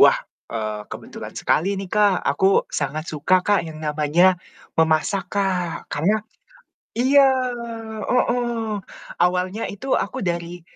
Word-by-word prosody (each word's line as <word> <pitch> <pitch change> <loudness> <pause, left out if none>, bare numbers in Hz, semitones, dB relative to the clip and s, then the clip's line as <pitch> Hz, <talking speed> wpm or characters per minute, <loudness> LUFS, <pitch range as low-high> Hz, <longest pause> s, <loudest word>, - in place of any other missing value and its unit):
Wah, - - +8 0.3
eee, 110 -2 -3
kebetulan - - -8
sekali 195 +6 +1
nih 195 -1 -5
Kak, 205 -4 +4
aku 190 +8 +3
sangat 150 +2 -2
suka 180 +5 +2
Kak, 205 -1 +3
yang 160 -1 -8
namanya 155 +5 +3 0.4
memasak 160 +4 +2
Kak, 185 -4 -1
karena 205 +8 +1 0.7
iya, 270 +4 +5 0.8
heeh, 240 -3 0 0.4
awalnya 180 +4 +1
itu 260 +7 -2
aku - - -3
dari 175 -1 -3
185 Hz, 115 wpm, -22 LUFS, 160-205 Hz, 0.8 s, Wah